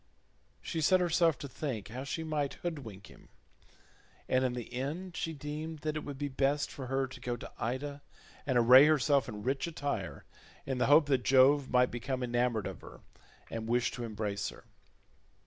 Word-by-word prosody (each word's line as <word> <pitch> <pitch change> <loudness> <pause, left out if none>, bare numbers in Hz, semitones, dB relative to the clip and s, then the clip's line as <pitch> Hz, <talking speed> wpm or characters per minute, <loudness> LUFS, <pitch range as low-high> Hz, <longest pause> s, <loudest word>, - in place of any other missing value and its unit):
She 160 - -3
set 185 +4 +5
herself 170 -3 +3
to 140 - -7
think 130 -7 -5
how 125 +4 -5
she 160 +4 -3
might 150 -3 -2
hoodwink 135 - -5
him, - - -17 1.0
and 130 0 +2
in 125 -1 0
the 125 -1 -6
end 160 +8 -4
she 165 - -2
deemed 150 +1 -6
that 155 0 -2
it 155 - -3
would 140 -2 -6
be 145 +1 -2
best 140 +1 0
for 130 -2 -7
her 135 +1 0
to 130 - -10
go 120 -1 -3
to - - -9
Ida 140 +5 -3 0.5
and 130 -3 +2
array 125 +4 +8
herself 145 -4 +3
in 105 -2 -7
rich 135 +5 -1
attire, 145 -4 -4 0.4
in 135 -2 -2
the - - +2
hope 145 +2 +7
that 135 -3 +2
Jove 135 +1 +5
might 125 0 +3
become 125 +2 -3
enamoured 120 -3 0
of - - -6
her, - - -12 0.5
and 115 -1 -4
wish 120 0 +2
to 120 - -6
embrace 105 -3 -3
her. - - -13
135 Hz, 185 wpm, -31 LUFS, 125-150 Hz, 1.0 s, array